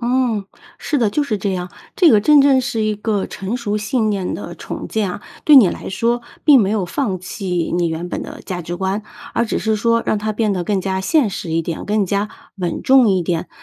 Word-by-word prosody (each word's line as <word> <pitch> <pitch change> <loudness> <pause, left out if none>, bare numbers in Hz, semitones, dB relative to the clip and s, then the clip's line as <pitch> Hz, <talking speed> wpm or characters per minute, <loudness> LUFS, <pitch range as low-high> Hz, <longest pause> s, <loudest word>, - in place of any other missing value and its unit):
嗯， 240 -4 0 0.3
是 300 - -2
的， 225 -4 +2
就 295 - 0
是 230 -7 -1
这 195 0 -1
样。 180 -1 -4 0.3
这 355 - +6
个 215 - +5
真 295 +7 +6
正 275 -1 +5
是 235 -3 -2
一 215 0 0
个 210 -1 -1
成 200 +5 -4
熟 210 -4 -2
信 215 +1 0
念 195 -3 -2
的 - - -7
重 - - -7
建 210 -4 -1
啊。 180 - -7 0.2
对 300 -2 +8
你 215 -9 +8
来 - - -5
说， 235 +5 0 0.2
并 285 -4 +7
没 195 -2 +1
有 210 -3 0
放 195 -3 -2
弃 180 -2 -3
你 175 -1 +1
原 165 +2 -4
本 - - -4
的 - - -9
价 180 -2 -4
值 175 +2 -5
观， 190 +3 -2 0.3
而 - - +2
只 225 - -2
是 220 0 0
说 230 +2 +1
让 - - +1
它 215 +1 -2
变 215 -1 0
得 180 -2 -1
更 195 +1 0
加 190 0 -2
现 280 +4 +2
实 175 - -5
一 165 +1 0
点， 165 0 -5
更 205 -2 0
加 200 +2 -1 0.3
稳 175 -2 -2
重 260 -3 +5
一 190 -3 +2
点。 170 0 -2
210 Hz, 255 characters per minute, -19 LUFS, 185-235 Hz, 0.3 s, 对